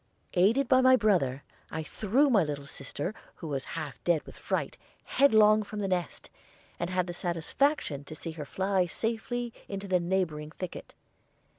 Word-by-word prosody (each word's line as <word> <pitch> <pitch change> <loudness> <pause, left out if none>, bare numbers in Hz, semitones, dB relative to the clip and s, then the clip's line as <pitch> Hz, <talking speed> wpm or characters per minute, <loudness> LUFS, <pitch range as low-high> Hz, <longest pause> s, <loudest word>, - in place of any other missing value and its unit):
Aided 220 +9 +4
by 260 0 +5
my 260 0 +7
brother, 170 - +2 0.3
I 160 - -4
threw 225 - +2
my 200 -6 +5
little 145 -2 -4
sister, 145 +6 -5 0.2
who 165 - -8
was 140 -3 -2
half 145 -7 -6
dead 170 -3 +2
with - - -12
fright, - - -2 0.3
headlong 215 -5 +5
from 210 0 -7
the 205 -1 -1
nest, 180 -4 -3 0.5
and 170 - -2
had 180 -1 +1
the 175 - -5
satisfaction 175 - 0
to 155 - -8
see 165 +2 -5
her 155 -2 -7
fly 190 +3 +1
safely 235 +4 -2
into 195 0 -5
the 185 -1 +3
neighboring 170 -4 -1
thicket. 180 +2 -8
185 Hz, 165 wpm, -29 LUFS, 155-215 Hz, 0.5 s, my